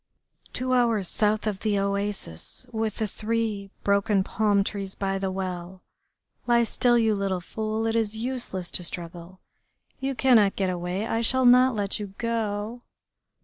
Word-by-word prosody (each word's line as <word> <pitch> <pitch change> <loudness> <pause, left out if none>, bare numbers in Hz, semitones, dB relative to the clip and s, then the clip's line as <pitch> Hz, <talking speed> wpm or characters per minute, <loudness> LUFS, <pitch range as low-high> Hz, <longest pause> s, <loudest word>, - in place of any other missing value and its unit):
"Two 255 0 -1
hours 230 -6 +2
south 210 +2 +1
of 205 -3 -2
the 210 -1 0
oasis 200 - -1
with 220 -2 -2
the 220 - -1
three 215 -1 -2
broken 200 0 +2
palm 205 0 +2
trees 195 -1 -4
by 195 -1 -2
the 190 0 -1
well.... 185 -1 -5 0.6
Lie 235 -1 +4
still, 240 +2 +2
you 225 -2 +3
little 195 -2 -1
fool, 220 +4 -3
it 225 0 0
is 220 -1 0
useless 230 -7 -3
to 180 - 0
struggle. 175 +1 -4 0.6
You 270 0 -2
cannot 230 -7 +4
get 190 -2 0
away, 180 +3 -3
I 225 0 -1
shall 260 +2 +3
not 250 0 +6
let 205 -1 -1
you 200 -2 -7
go.... 225 0 -2
210 Hz, 155 wpm, -26 LUFS, 195-230 Hz, 0.6 s, not